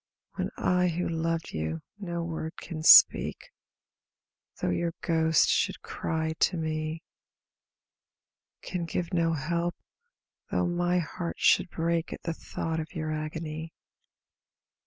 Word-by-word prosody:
When -, -, -2 dB
I 180 Hz, 0 st, +2 dB
who 175 Hz, +1 st, -1 dB
loved 165 Hz, 0 st, -2 dB
you 80 Hz, 0 st, -3 dB, 0.2 s
no 170 Hz, -4 st, -3 dB
word 160 Hz, -1 st, -4 dB
can 165 Hz, -3 st, -6 dB
speak, 155 Hz, -, +7 dB, 1.1 s
Though 90 Hz, -, 0 dB
your 170 Hz, -, -1 dB
ghost 160 Hz, -1 st, +3 dB
should -, -, +1 dB
cry 160 Hz, 0 st, -2 dB
to 180 Hz, -, +2 dB
me, 155 Hz, +1 st, -3 dB, 1.6 s
Can 180 Hz, -2 st, -3 dB
give 170 Hz, +1 st, -3 dB
no 165 Hz, -1 st, +2 dB
help, 170 Hz, +3 st, -1 dB, 0.7 s
though -, -, +1 dB
my 175 Hz, 0 st, +1 dB
heart 170 Hz, 0 st, -3 dB
should -, -, +4 dB
break 165 Hz, 0 st, -1 dB
At -, -, -9 dB
the 165 Hz, -, -2 dB
thought 160 Hz, 0 st, -4 dB
of 160 Hz, +3 st, -6 dB
your 155 Hz, -1 st, -2 dB
agony. 155 Hz, +1 st, -5 dB
165 Hz, 125 wpm, -28 LUFS, 160-170 Hz, 1.6 s, speak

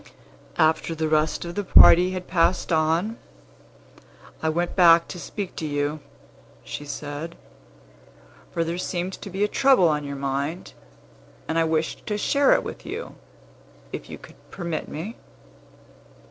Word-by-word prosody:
"After 160 Hz, +1 st, +2 dB
the 160 Hz, 0 st, -1 dB
rest 155 Hz, +2 st, +1 dB
of 170 Hz, -, -6 dB
the 205 Hz, -, -2 dB
party 180 Hz, -1 st, +7 dB
had 185 Hz, -1 st, -5 dB
passed 180 Hz, +1 st, +1 dB
on, 165 Hz, +8 st, +1 dB, 1.2 s
I 160 Hz, -, +1 dB
went 170 Hz, +2 st, -1 dB
back 170 Hz, -2 st, +6 dB
to 180 Hz, -, -7 dB
speak 195 Hz, +1 st, -6 dB
to 160 Hz, -, -3 dB
you," 145 Hz, +1 st, -2 dB, 0.6 s
she 145 Hz, -, -7 dB
said; 145 Hz, +3 st, -6 dB, 1.2 s
"for 165 Hz, -, 0 dB
there 170 Hz, +2 st, -3 dB
seemed 180 Hz, +1 st, -3 dB
to -, -, -7 dB
be 195 Hz, +2 st, -1 dB
a -, -, +3 dB
trouble 265 Hz, -5 st, +4 dB
on 150 Hz, -1 st, 0 dB
your 140 Hz, 0 st, -5 dB
mind, 140 Hz, +5 st, -3 dB, 0.7 s
and 160 Hz, +1 st, 0 dB
I 165 Hz, -, +3 dB
wished 160 Hz, 0 st, -2 dB
to 210 Hz, -, -1 dB
share 280 Hz, +6 st, +3 dB
it -, -, +1 dB
with -, -, -8 dB
you, -, -, -6 dB, 0.8 s
if -, -, -6 dB
you -, -, -7 dB
could -, -, -16 dB
permit 170 Hz, -4 st, -4 dB
me. 195 Hz, +10 st, -6 dB
165 Hz, 150 wpm, -24 LUFS, 155-185 Hz, 1.2 s, party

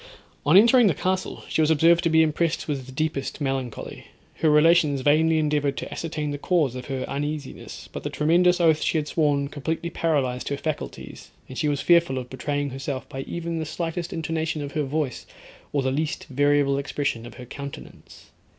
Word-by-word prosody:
On 160 Hz, +6 st, +7 dB
entering 235 Hz, +2 st, +7 dB
the 170 Hz, -, +2 dB
castle, 185 Hz, +4 st, -2 dB
she -, -, 0 dB
was 155 Hz, -, +3 dB
observed 165 Hz, +2 st, +5 dB
to -, -, +4 dB
be 160 Hz, 0 st, +5 dB
impressed 160 Hz, +1 st, 0 dB
with 135 Hz, -3 st, -4 dB
deepest 155 Hz, -2 st, -2 dB
melancholy. 135 Hz, -4 st, -4 dB, 0.3 s
Her 160 Hz, -, +2 dB
relations 150 Hz, -2 st, +4 dB
vainly 160 Hz, +3 st, +3 dB
endeavoured 150 Hz, -2 st, 0 dB
to -, -, -5 dB
ascertain 155 Hz, -2 st, -3 dB
the 145 Hz, -, -4 dB
cause 155 Hz, -6 st, +1 dB
of 125 Hz, -1 st, -7 dB
her 135 Hz, -2 st, -3 dB
uneasiness; 145 Hz, 0 st, -5 dB
but -, -, -5 dB
the -, -, -4 dB
tremendous 175 Hz, +4 st, +3 dB
oath 160 Hz, -2 st, +4 dB
she -, -, +1 dB
had 150 Hz, -1 st, -1 dB
sworn 145 Hz, -3 st, +1 dB
completely 160 Hz, +4 st, -4 dB
paralysed 140 Hz, -7 st, 0 dB
her 140 Hz, -, -2 dB
faculties, 155 Hz, +1 st, -6 dB, 0.2 s
and 130 Hz, -, -9 dB
she 150 Hz, -, 0 dB
was 145 Hz, -1 st, 0 dB
fearful 170 Hz, -6 st, +4 dB
of 125 Hz, -1 st, -6 dB
betraying 145 Hz, +1 st, -2 dB
herself 135 Hz, 0 st, -5 dB
by 135 Hz, -, -5 dB
even 170 Hz, -1 st, -3 dB
the -, -, -2 dB
slightest 170 Hz, +2 st, -4 dB
intonation 160 Hz, -2 st, -2 dB
of 140 Hz, -, -6 dB
her 150 Hz, -, -1 dB
voice, 140 Hz, -2 st, -3 dB, 0.4 s
or 140 Hz, -2 st, 0 dB
the 130 Hz, -, 0 dB
least 155 Hz, +3 st, -2 dB
variable 145 Hz, 0 st, +2 dB
expression 140 Hz, -4 st, -2 dB
of -, -, -12 dB
her 125 Hz, -, -9 dB
countenance. 140 Hz, +2 st, -10 dB
150 Hz, 185 wpm, -24 LUFS, 140-165 Hz, 0.4 s, On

